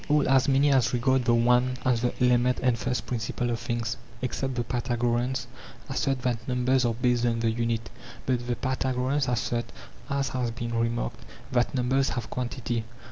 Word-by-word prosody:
b - - -16
381. 150 -2 +3
All, - - +6
as 130 - +4
many 140 +2 +4
as 125 -3 +3
regard 130 +1 +2
the 120 - +4
one 125 +2 +3
as 125 -3 +2
the 125 - +1
element 125 0 +3
and 125 -2 +3
first 125 +2 -2
principle 120 0 -2
of 115 - -2
things, 120 0 -2 0.3
except 130 +1 -2
the 120 - 0
Pythagoreans, 120 +1 -1 0.4
assert 135 -1 -1
that 120 -3 -1
numbers 125 0 +2
are 115 -1 +1
based 125 0 +1
on 115 -1 +1
the 115 -1 +2
unit; 115 0 -1 0.4
but 125 -2 0
the 120 - 0
Pythagoreans 130 +2 0
assert, 120 -1 0 0.4
as 140 -1 0
has 125 -2 -1
been 115 0 -4
remarked, 115 - -1 0.3
that 120 +1 +1
numbers 130 +2 +2
have 120 - -4
quantity. 120 -2 -2
125 Hz, 185 wpm, -27 LUFS, 120-130 Hz, 0.4 s, All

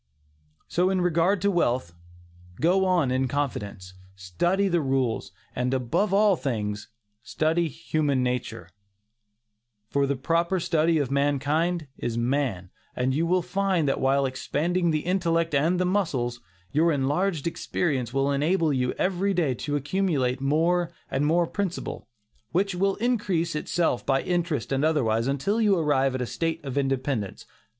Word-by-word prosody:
So 180 +2 +1
in 190 -1 +1
regard 175 +2 +2
to 200 - +3
wealth. 125 - 0 0.7
Go 185 +4 +3
on 175 -8 +2
in 130 +1 +1
confidence, 105 -9 -4 0.2
study 175 - 0
the 175 -3 +1
rules, 135 -4 -1 0.2
and 125 +1 0
above 130 - 0
all 205 0 +4
things, 105 -8 -3 0.3
study 160 +6 0
human 140 +1 -1
nature; 125 -8 -3 1.2
for 140 0 +2
"the 140 - 0
proper 170 +7 0
study 165 -1 +2
of 140 -4 -1
mankind 145 +4 +1
is 115 -1 -2
man," 120 -7 -1 0.2
and 130 +1 0
you 165 +4 +1
will 180 +1 +2
find 190 -5 0
that 135 - 0
while 135 +1 +2
expanding 160 +7 -1
the 155 -1 +1
intellect 170 -3 +1
and 165 +6 +2
the 180 - +2
muscles, 135 -11 -1 0.3
your 165 +3 +3
enlarged 150 +4 0
experience 140 -7 -1
will 135 +1 +1
enable 155 +2 +1
you 125 -1 0
every 195 +1 0
day 160 -7 +1
to 145 +4 -3
accumulate 140 -4 0
more 165 +5 +2 0.2
and 145 +2 +1
more 170 +2 +3
principal, 195 0 -4 0.4
which 195 +3 +1
will 195 +2 +1
increase 205 -8 0
itself 155 -3 0
by 135 -1 +1
interest 170 -9 -1
and 135 +1 +1
otherwise, 120 -7 +1
until 145 - 0
you 205 -3 +4
arrive 135 -4 +1
at 130 - -1
a - - -2
state 165 +6 -2
of 135 -1 -4
independence. 135 -6 -2
150 Hz, 150 wpm, -26 LUFS, 130-175 Hz, 1.2 s, all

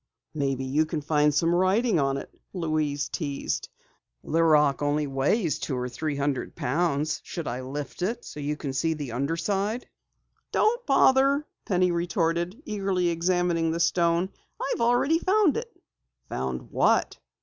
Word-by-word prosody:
"Maybe 135 -3 -1
you 150 +4 +1
can 155 -1 -3
find 150 0 +3
some 165 +4 +2
writing 190 +3 +3
on 135 -1 +1
it," - - -8 0.2
Louise 155 -5 -1
teased. 145 -4 -3 0.5
"The 165 +2 +1
rock 150 -3 +4
only 145 +1 +1
weighs 145 - 0
two 130 - -3
or 125 0 -2
three 150 +4 -3
hundred 140 -2 -2
pounds. 150 +1 0
Shall 170 - -6
I 125 +2 -3
lift 140 +6 -6
it 180 - +2
for - - +1
you 240 - -27
so - - -9
you 150 +1 -2
can 140 -2 -4
see 160 +4 0
the 145 -5 -5
under 140 +7 -1
side?" 205 +7 -1 0.6
"Don't 480 +3 +2
bother," 275 +1 +4 0.2
Penny 180 -2 +2
retorted, 170 - -1
eagerly 195 - 0
examining 170 -1 +1
the 165 +1 -1
stone. 170 +1 +2 0.4
"I've - - -4
already 245 +7 +3
found 380 -3 +3
it." 465 0 -4 0.6
"Found 65 -1 -4
what?" - - +2
165 Hz, 160 wpm, -26 LUFS, 145-185 Hz, 0.6 s, rock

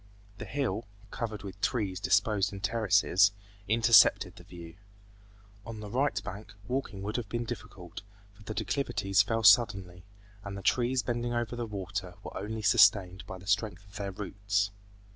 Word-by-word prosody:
The - - -6
hill, 125 -5 -2 0.2
covered 110 -3 -5
with 95 0 -9
trees 100 -7 -1
disposed 100 0 +2
in 100 - -7
terraces, 100 -2 +3 0.3
intercepted 115 0 +5
the - - -14
view. 85 -1 -12 0.9
On 110 -1 -8
the 105 -1 -8
right 135 +5 +1
bank 105 +1 -8
walking 125 -6 -3
would 105 +4 -3
have 115 -4 -5
been 120 0 -2
difficult, 100 -4 -8 0.3
for 100 - -20
the 105 +1 -7
declivities 100 -8 +1
fell 115 +2 -1
suddenly, 95 -5 +4 0.4
and 100 -1 -6
the 100 - -8
trees 125 +1 +1
bending 120 0 -2
over 120 0 -2
the 120 -1 -4
water 95 -3 -5
were - - -9
only 110 +1 -5
sustained 100 -3 +4
by 95 -3 -7
the 90 - -14
strength 100 -1 -1
of 100 +1 -13
their 100 -1 -4
roots. 100 +1 -2
105 Hz, 160 wpm, -29 LUFS, 95-115 Hz, 0.9 s, intercepted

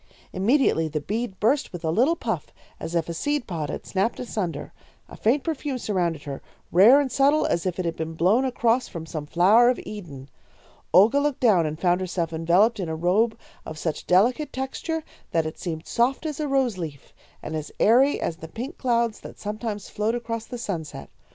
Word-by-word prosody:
"Immediately 195 - +2
the 155 0 -2
bead 210 +5 -4
burst 265 +7 +1
with 175 -1 -8
a 160 - +1
little 255 - +3
puff, - - -4 0.3
as 170 - -5
if 165 -2 0
a 170 - -4
seed 290 - -1
pod 160 -5 -4
had - - -5
snapped 195 +4 -1
asunder. 210 -8 -4 0.3
A - - -11
faint 255 +6 +1
perfume 295 -4 -3
surrounded 175 - -1
her, 140 -2 -6 0.3
rare 215 +11 +7
and 275 -3 -1
subtle 280 +4 +3
as 170 +2 0
if 180 - -2
it 185 - -2
had 165 -1 -1
been 160 0 -4
blown 190 +10 +3
across 245 -1 +1
from 165 -4 -7
some 155 -2 -6
flower 205 +10 +5
of 250 - 0
Eden. 150 -11 -8 0.6
Olga 220 +9 +6
looked 290 -2 0
down 190 -10 +4
and 155 +1 -5
found 180 0 +2
herself 170 -3 -2
enveloped 180 +8 +3
in 180 -4 -3
a 160 - -2
robe 205 +8 +1 0.3
of 155 - -8
such 155 0 -4
delicate 240 +11 +3
texture 310 +5 -3 0.3
that 165 -1 +1
it 155 - -6
seemed 160 -3 -5
soft 255 +6 0
as 305 -2 -4
a 300 - -1
rose 265 -8 +1
leaf, 150 -5 -7 0.3
and 160 - -5
as 155 -1 -5
airy 260 +6 +4
as 165 - -3
the 160 - -9
pink 250 - -7
clouds 235 -3 +1
that - - -11
sometimes 210 -1 -5
float 215 +3 -1
across 230 -1 -4
the 245 - -6
sunset. 175 -10 -5
210 Hz, 200 wpm, -25 LUFS, 165-245 Hz, 0.6 s, rare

